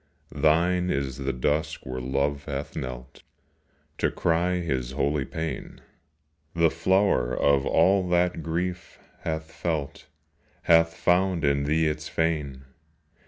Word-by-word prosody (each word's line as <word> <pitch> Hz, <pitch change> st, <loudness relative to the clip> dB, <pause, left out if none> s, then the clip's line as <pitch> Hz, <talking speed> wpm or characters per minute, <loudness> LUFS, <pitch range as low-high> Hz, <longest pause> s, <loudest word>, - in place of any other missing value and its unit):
Thine 85 Hz, +5 st, +2 dB
is 70 Hz, -5 st, -2 dB
the 70 Hz, 0 st, -1 dB
dusk 75 Hz, +5 st, -1 dB
where 65 Hz, 0 st, -4 dB
Love 70 Hz, +3 st, -1 dB
hath 70 Hz, -1 st, -5 dB
knelt 65 Hz, 0 st, -7 dB, 0.8 s
To -, -, +2 dB
cry 85 Hz, +2 st, +1 dB
his 65 Hz, -9 st, -2 dB
holy 70 Hz, -2 st, 0 dB
pain; 80 Hz, 0 st, -5 dB, 0.8 s
The 85 Hz, -1 st, +3 dB
flower 95 Hz, -6 st, +1 dB
of 70 Hz, -1 st, +3 dB
all 95 Hz, -1 st, +3 dB
that 90 Hz, -1 st, +1 dB
Grief 85 Hz, +3 st, -3 dB, 0.2 s
hath 80 Hz, 0 st, -4 dB
felt 80 Hz, -5 st, -4 dB, 0.6 s
Hath 80 Hz, 0 st, +4 dB
found 90 Hz, -2 st, +2 dB
in 70 Hz, 0 st, +2 dB
thee 80 Hz, +2 st, +2 dB
its 75 Hz, 0 st, -2 dB
fane. 75 Hz, -5 st, -2 dB
80 Hz, 120 wpm, -26 LUFS, 70-85 Hz, 0.8 s, Hath